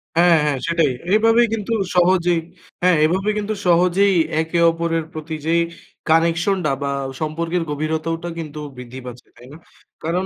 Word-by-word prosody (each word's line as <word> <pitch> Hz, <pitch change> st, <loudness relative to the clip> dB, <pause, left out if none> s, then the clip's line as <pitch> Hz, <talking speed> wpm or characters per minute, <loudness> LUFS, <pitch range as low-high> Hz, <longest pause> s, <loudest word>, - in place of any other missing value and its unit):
হ্যাঁ, 170 Hz, 0 st, +5 dB
হ্যাঁ, 150 Hz, -2 st, 0 dB
সেটাই। 165 Hz, -4 st, +2 dB, 0.2 s
এভাবেই 225 Hz, +2 st, +4 dB
কিন্তু 225 Hz, 0 st, -2 dB, 0.2 s
সহজেই 175 Hz, -1 st, +3 dB, 0.4 s
হ্যাঁ, 180 Hz, -1 st, +4 dB
এভাবেই 190 Hz, +6 st, 0 dB
কিন্তু 210 Hz, +1 st, -2 dB
সহজেই 180 Hz, +3 st, +4 dB, 0.3 s
একে 160 Hz, +2 st, -2 dB
অপরের 165 Hz, 0 st, -1 dB
প্রতি 155 Hz, 0 st, -6 dB
যেই 165 Hz, +1 st, +2 dB, 0.5 s
connection 165 Hz, +4 st, +3 dB
টা 150 Hz, -, +2 dB
বা 140 Hz, -, -1 dB, 0.3 s
সম্পর্কের 165 Hz, +3 st, -2 dB
গভীরতাওটা 160 Hz, +3 st, -2 dB
কিন্তু 155 Hz, -2 st, -7 dB, 0.2 s
বৃদ্ধি 125 Hz, +1 st, -9 dB
পাচ্ছে, 125 Hz, 0 st, -10 dB
তাই 120 Hz, -, -15 dB
না? -, -, -11 dB, 0.5 s
কারণ 175 Hz, +4 st, -1 dB
165 Hz, 145 wpm, -20 LUFS, 155-180 Hz, 0.5 s, হ্যাঁ